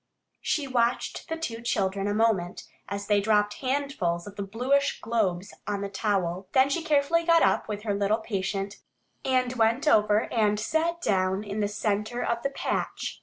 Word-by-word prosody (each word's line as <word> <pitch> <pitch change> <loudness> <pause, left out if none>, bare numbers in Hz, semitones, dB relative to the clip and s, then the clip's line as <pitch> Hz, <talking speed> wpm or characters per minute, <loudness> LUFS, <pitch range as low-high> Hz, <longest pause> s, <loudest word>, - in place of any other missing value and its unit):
She 295 - 0
watched 245 -2 -1
the 325 - -2
two 230 -8 -4
children 195 -3 0
a 205 - 0
moment 210 -6 +1 0.3
as 200 0 -4
they 205 -1 +3
dropped 210 0 +2
handfuls 255 -11 -1
of 205 - -10
the - - -5
bluish 255 +8 0
globes 200 -5 -1
on 205 -1 -2
the 200 - -3
towel. 190 -2 -1
Then 265 +1 +5
she 335 - 0
carefully 320 +1 +2
got 335 0 +5
up - - +2
with 210 -1 -5
her 210 -2 0
little 200 +2 +1
patient 200 -2 -3 0.5
and 255 -1 +1
went 230 +6 +2
over 210 -5 +4
and 210 -2 +2
sat 330 +8 -1
down 190 - +1
in 205 0 -4
the 205 - +1
center 210 +3 -2
of 235 0 -1
the 275 - -1
patch. 275 - -3
215 Hz, 175 wpm, -27 LUFS, 200-255 Hz, 0.5 s, Then